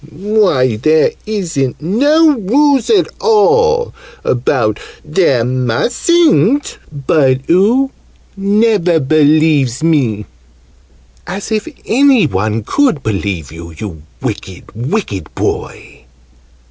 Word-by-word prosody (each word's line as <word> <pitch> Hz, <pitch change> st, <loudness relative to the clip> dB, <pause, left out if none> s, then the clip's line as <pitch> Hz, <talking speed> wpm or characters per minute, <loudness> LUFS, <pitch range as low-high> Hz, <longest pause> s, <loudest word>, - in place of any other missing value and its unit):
Why, 165 Hz, -, 0 dB
there 155 Hz, +7 st, +2 dB, 0.2 s
isn't 170 Hz, -, -2 dB
no 290 Hz, -, +2 dB
rules 265 Hz, +4 st, +1 dB
at 410 Hz, -4 st, +3 dB
all 465 Hz, +2 st, +2 dB, 0.3 s
about 120 Hz, -4 st, 0 dB, 0.3 s
'There 150 Hz, -6 st, +1 dB
mustn't'! 210 Hz, -, +1 dB
But 135 Hz, -2 st, 0 dB
oo 225 Hz, +10 st, +2 dB, 0.4 s
never 200 Hz, -4 st, +1 dB
believes 150 Hz, -2 st, +2 dB
me!" 125 Hz, -11 st, 0 dB, 1.0 s
"As 195 Hz, +4 st, -6 dB
if 215 Hz, +4 st, -1 dB, 0.2 s
any 260 Hz, -, +3 dB
one 110 Hz, -2 st, -2 dB
could 250 Hz, -, 0 dB
believe 95 Hz, -8 st, -3 dB
you, 85 Hz, 0 st, -10 dB
you 85 Hz, -5 st, -7 dB, 0.2 s
wicked 95 Hz, -2 st, -6 dB
wicked 115 Hz, -, -4 dB
boy!" -, -, -5 dB
160 Hz, 95 wpm, -14 LUFS, -, 1.0 s, at